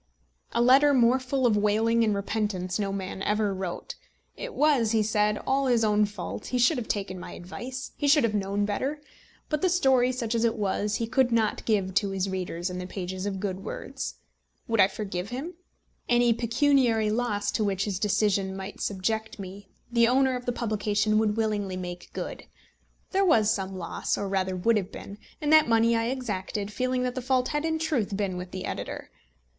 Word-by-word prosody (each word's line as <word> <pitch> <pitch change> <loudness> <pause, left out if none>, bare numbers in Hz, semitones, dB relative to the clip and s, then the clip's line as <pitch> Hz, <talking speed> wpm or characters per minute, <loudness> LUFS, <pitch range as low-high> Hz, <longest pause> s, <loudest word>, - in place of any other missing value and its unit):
A 235 - +3
letter 275 +3 +6
more 245 +1 +4
full 260 0 -1
of 230 -3 +4
wailing 220 +3 +2
and 215 -2 +2
repentance 200 -2 -2
no 200 -1 -1
man 190 -1 -5
ever 210 0 +1
wrote. 185 -2 -5 0.4
It - - -7
was, 275 -7 +3
he 220 -1 +3
said, 210 0 +1
all 270 0 +1
his 240 -3 +3
own 210 -1 +3
fault. 205 -3 -6
He 250 - -1
should 250 +3 +3
have 230 - -6
taken 195 -3 -3
my - - -8
advice. 250 +9 -7
He 290 - 0
should 290 0 +5
have 230 -2 +1
known 200 0 0
better. 265 +9 -2 0.5
But 300 -1 -1
the 370 - +3
story, 265 -8 +3
such 240 -3 -3
as 230 0 +1
it 230 0 +2
was, 205 0 -1
he 230 - -1
could 245 +2 +2
not 225 -2 +1
give 195 -4 +1
to 200 +1 +2
his 195 0 -1
readers 180 -1 -3
in 180 - -5
the 180 - -5
pages 185 +1 -4
of 195 -2 -3
Good 190 -1 -3
Words. - - -5 0.5
Would 225 -1 0
I 190 - +7
forgive 195 -2 -5
him? 275 +9 -5 0.6
Any 240 -1 +4
pecuniary 235 -2 +2
loss 215 -3 0
to 220 - 0
which 200 -1 0
his 195 -3 -2
decision 200 -2 +1
might 195 +1 -7
subject 220 +3 -2
me 195 0 -9 0.2
the 235 -1 +4
owner 260 +1 +3
of 250 0 -6
the - - +2
publication 215 -2 0
would 215 -1 +1
willingly 205 -4 -1
make 180 -1 -7
good. - - -6 0.7
There 390 0 +2
was 220 - +4
some 190 -1 -4
loss 170 -2 -2
or 200 - -2
rather 190 -1 -1
would 220 +5 +2
have 190 -3 -3
been 200 +1 -9 0.2
and 300 0 +1
that 310 -5 +6
money 230 0 +4
I 230 0 +1
exacted, 210 -5 -3
feeling 255 +1 0
that 250 -1 -1
the 255 - -4
fault 255 0 +1
had 295 +1 -1
in 320 0 0
truth 260 -11 -1
been 195 -3 -1
with 180 0 -6
the 185 0 -5
editor. - - -5
215 Hz, 200 wpm, -27 LUFS, 195-245 Hz, 0.7 s, I